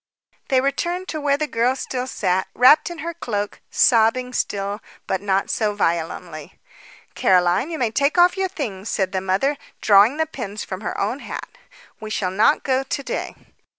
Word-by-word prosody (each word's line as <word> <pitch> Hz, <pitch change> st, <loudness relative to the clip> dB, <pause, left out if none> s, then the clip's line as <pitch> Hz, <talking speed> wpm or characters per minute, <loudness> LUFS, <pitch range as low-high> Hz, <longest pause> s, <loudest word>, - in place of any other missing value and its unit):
They 260 Hz, -1 st, +3 dB
returned 345 Hz, +7 st, -2 dB
to 310 Hz, -, -4 dB
where 285 Hz, -1 st, +2 dB
the 305 Hz, -, -1 dB
girl 245 Hz, -2 st, +1 dB
still 255 Hz, -1 st, -4 dB
sat, 190 Hz, -6 st, -1 dB
wrapped 290 Hz, +7 st, +6 dB
in 345 Hz, -, -7 dB
her 340 Hz, -, -3 dB
cloak, 205 Hz, -10 st, -4 dB
sobbing 250 Hz, +2 st, +3 dB
still, 200 Hz, -2 st, -2 dB, 0.2 s
but 190 Hz, -, -2 dB
not 195 Hz, -1 st, 0 dB
so 210 Hz, -2 st, 0 dB
violently. 165 Hz, -3 st, -3 dB, 0.5 s
"Caroline, 180 Hz, -, +2 dB
you 325 Hz, -, -4 dB
may 240 Hz, -5 st, 0 dB
take 280 Hz, +8 st, +1 dB
off 355 Hz, +1 st, +5 dB
your 385 Hz, -1 st, -1 dB
things," 215 Hz, -, -5 dB
said 190 Hz, -2 st, -1 dB
the 190 Hz, -1 st, -1 dB
mother, 195 Hz, +10 st, 0 dB, 0.2 s
drawing 210 Hz, +6 st, +5 dB
the 320 Hz, -, +1 dB
pins 215 Hz, -9 st, -6 dB
from -, -, -6 dB
her -, -, -4 dB
own -, -, -1 dB
hat. -, -, -7 dB, 0.5 s
"We 215 Hz, -1 st, -7 dB
shall 190 Hz, -3 st, -1 dB
not 210 Hz, +10 st, +3 dB
go 265 Hz, -1 st, +1 dB
to 275 Hz, +1 st, -4 dB
day." -, -, -4 dB
230 Hz, 180 wpm, -22 LUFS, 195-280 Hz, 0.5 s, wrapped